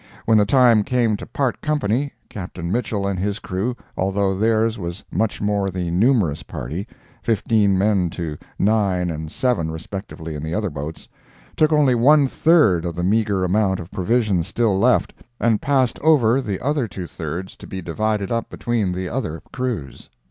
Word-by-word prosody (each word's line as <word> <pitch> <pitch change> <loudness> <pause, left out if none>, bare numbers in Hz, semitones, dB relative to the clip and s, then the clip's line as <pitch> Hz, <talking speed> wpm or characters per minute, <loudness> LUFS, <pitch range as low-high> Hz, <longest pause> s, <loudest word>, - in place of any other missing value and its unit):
When 110 -1 +5
the 105 - +3
time 120 -3 +5
came 120 -2 +1
to - - -9
part 135 -4 -1
company, 145 -2 0 0.2
Captain 90 -3 -6
Mitchell 105 -3 -1
and 100 -2 -1
his 100 +2 -1
crew, 105 +5 -3 0.2
although 95 +1 0
theirs 110 +2 +1
was 85 +2 -5
much 110 -1 0
the - - -3
more 100 -1 +1
numerous 90 - +1
party 80 - -6 0.3
(fifteen 105 -3 +2
men 95 -3 +2
to 80 -2 -4 0.2
nine 95 -4 +1
and 80 0 -6
seven 120 -11 0
respectively 80 0 -7
in 75 - -5
the 80 +2 -3
other 105 -3 -1
boats), 75 +2 -7 0.5
took 155 0 +3
only 150 -4 +4
one 140 +4 +5
third 140 - +4
of 85 -2 -3
the 90 - -2
meager 100 -1 +1
amount 95 +1 +1
of 85 +2 -9
provisions 100 -3 +1
still 110 +1 +1
left, 95 - +2 0.3
and 115 -3 +2
passed 130 -4 +1
over 135 -5 +4
the 100 -7 -3
other 140 -2 0
two 95 -3 -6
thirds 85 +3 -6
to - - -11
be 95 - -5
divided 100 +3 -2
up 115 -1 -1
between 110 -6 -1
the 90 0 -3
other 90 -9 -4
crews. 125 - -4
100 Hz, 170 wpm, -21 LUFS, 90-115 Hz, 0.5 s, When